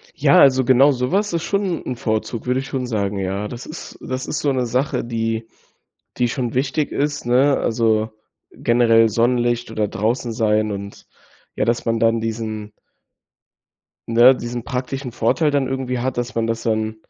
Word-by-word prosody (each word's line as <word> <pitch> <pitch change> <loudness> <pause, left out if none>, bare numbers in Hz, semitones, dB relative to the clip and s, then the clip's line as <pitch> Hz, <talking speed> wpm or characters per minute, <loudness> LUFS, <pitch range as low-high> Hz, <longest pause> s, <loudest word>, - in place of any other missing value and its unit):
Ja, - - +4
also, 130 -2 +5
genau 130 +3 +5
sowas 175 +12 0
ist 165 -1 -1
schon 200 -2 -1
'n 125 - -3
Vorzug, 110 0 -3
würde 125 +1 +1
ich 135 - -6
schon 130 -2 -3
sagen. 105 -4 -2
Ja, 95 +2 -2
das 120 +2 -8
ist 160 - -9
das 130 0 -4
ist - - -3
so 145 - +1
'ne 130 -2 0
Sache, 130 +5 -1
die 115 -1 -2 0.7
die 125 - +2
schon 120 -2 -3
wichtig 140 +3 -1
ist, 145 -1 -2
ne, 130 +4 +3
also, 110 -1 +1 0.4
generell 115 -1 +3
Sonnenlicht 120 +1 +1
oder 110 -2 -1
draußen 115 +5 -1
sein 110 -1 +1
und, 100 0 -7 0.5
ja, - - 0
dass 120 +1 0
man 115 -1 0
dann 115 0 +3
diesen 110 -1 -4 1.4
ne, 120 +3 +6
diesen 120 -1 -5
praktischen 130 0 -4
Vorteil 145 +7 +1
dann 140 -2 +1
irgendwie 130 -1 -2
hat, 130 0 -2
dass 120 0 -3
man 115 0 0
das 115 0 -2
dann, 110 -1 -1
120 Hz, 170 wpm, -20 LUFS, 115-130 Hz, 1.4 s, ne